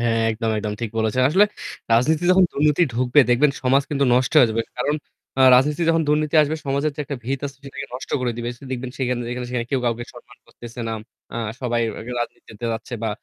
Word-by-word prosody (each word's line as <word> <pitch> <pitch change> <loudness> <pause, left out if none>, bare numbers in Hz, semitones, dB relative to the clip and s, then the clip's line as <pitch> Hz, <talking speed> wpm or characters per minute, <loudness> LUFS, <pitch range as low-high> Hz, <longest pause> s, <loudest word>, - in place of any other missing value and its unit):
হ্যাঁ, 115 -1 +1
একদম, 110 0 -2
একদম 105 0 -3
ঠিক 115 -3 -3
বলেছেন। 110 +3 +1
আসলে 190 +6 +6 0.5
রাজনীতি 150 +8 +3
যখন 185 0 +6
দুর্নীতি 150 +3 +2
ঢুকবে, 125 +4 +4
দেখবেন 135 +5 +4
সমাজ 135 +2 +3
কিন্তু 140 -1 +1
নষ্ট 125 0 +1
হয়ে 120 - +6
যাবে। 115 +1 0
কারণ 140 +4 0 0.4
আ - - +2 0.2
রাজনীতি 150 +5 +2
যখন 165 0 +2
দুর্নীতি 150 +1 +1
আসবে, 155 +2 -1
সমাজের 140 +2 0
যে - - -4
একটা 140 0 -5
ভিত 135 +3 -2
আছে 140 -1 -10
সেটাকে 135 - -7
নষ্ট 130 - -7
করে 125 -1 -1
দিবে। 120 0 -3 0.2
দেখবেন 125 0 -4 0.4
যেখানে 125 0 -4
সেখানে 125 -1 -1
কেউ 135 - +1
কাউকে 120 0 -1
সম্মান - - -15
করতেছে 120 0 -10
না। 115 - -2 0.4
আ - - -3 0.2
সবাই 120 -2 0 0.4
রাজনীতিতে 115 -1 -7
যাচ্ছে 115 +3 -5
বা 115 - 0
125 Hz, 200 wpm, -22 LUFS, 120-145 Hz, 0.5 s, আসলে